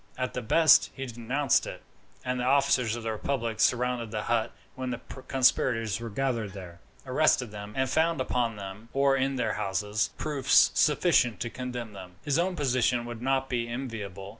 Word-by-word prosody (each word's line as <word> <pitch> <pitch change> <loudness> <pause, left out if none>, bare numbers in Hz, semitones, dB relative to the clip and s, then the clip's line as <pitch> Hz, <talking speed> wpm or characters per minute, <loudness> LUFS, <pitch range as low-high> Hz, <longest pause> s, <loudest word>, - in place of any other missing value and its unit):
At 125 0 -3
the 125 - -3
best, 155 +8 +5
if - - -16
he 135 - -4
denounced 125 +3 0
it, - - -8 0.4
and 125 0 -1
the - - -1
officers 130 -3 +2
of 120 - -7
the 115 - -2
republic 115 0 -3
surrounded 125 -1 +1
the 105 -1 -3
hut 115 -1 0 0.2
when 130 -1 -5
the 120 - -3 0.3
conspirators 120 -4 +2
were 115 0 -6
gathered 115 -3 -2
there, 90 -3 -10 0.3
arrested 130 -3 +2
them, 105 0 -8
and 130 0 +1
found 160 +2 +1
upon 120 -3 -1
them, 100 +3 -9
or 140 0 +3
in 135 0 0
their 125 - -1
houses, 105 +2 -1
proofs 140 -3 +3
sufficient 145 - +3
to 120 - -3
condemn 125 -3 -6
them, 90 -2 -11
his 145 +2 +1
own 180 +1 0
position 125 -5 +1
would 120 -1 -7
not 135 +1 0
be 120 -3 -2
enviable. 105 -6 -6
125 Hz, 185 wpm, -28 LUFS, 110-135 Hz, 0.4 s, best